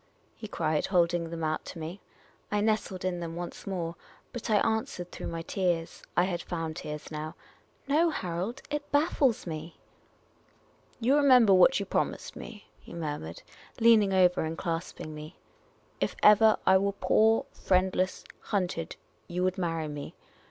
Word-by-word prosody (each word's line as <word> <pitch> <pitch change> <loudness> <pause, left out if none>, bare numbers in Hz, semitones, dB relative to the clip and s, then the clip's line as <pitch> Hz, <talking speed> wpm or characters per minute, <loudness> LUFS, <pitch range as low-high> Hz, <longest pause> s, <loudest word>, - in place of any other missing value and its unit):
he 220 - -8
cried, 155 -6 0
holding 175 -2 +2
them 165 -1 -5
out 155 0 -1
to - - -9
me. 165 +4 -6 0.5
I 210 - +1
nestled 205 -3 0
in 180 -1 -1
them 165 -1 -5
once 175 +2 -7
more; 175 -4 -3 0.4
but 240 -2 -5
I 215 - +4
answered 205 -5 0
through - - -6
my 165 0 -4
tears 175 -3 -1
— - - -34
I 175 - +6
had 180 -2 -1
found 165 -3 -4
tears 150 +1 -6
now 155 0 -5 0.3
— - - -37
"No, 315 +4 +3
Harold; 190 - -4
it 295 0 -3
baffles 290 -5 +2
me." 160 0 -6 0.6
" - - -34
You 250 +4 +3
remember 255 -8 +6
what 190 +8 +6
you 200 - -3
promised - - -2
me? 215 -3 -10
" - - -35
he - - -12
murmured, 145 - -5 0.4
leaning 225 -3 +5
over 180 -2 +4
me 160 - -1
and 165 +1 -5
clasping 165 -2 -4
me. 155 +3 -9 0.3
" - - -35
If - - 0
ever 215 +1 +7
I 190 0 +6
were 200 +1 0
poor, 220 +2 +3
friendless, 185 0 0 0.2
hunted 180 -5 -2 0.2
— - - -38
you 180 +1 -2
would 185 +1 0
marry 165 -3 -1
me. 145 -1 -7
185 Hz, 175 wpm, -29 LUFS, 165-215 Hz, 0.6 s, ever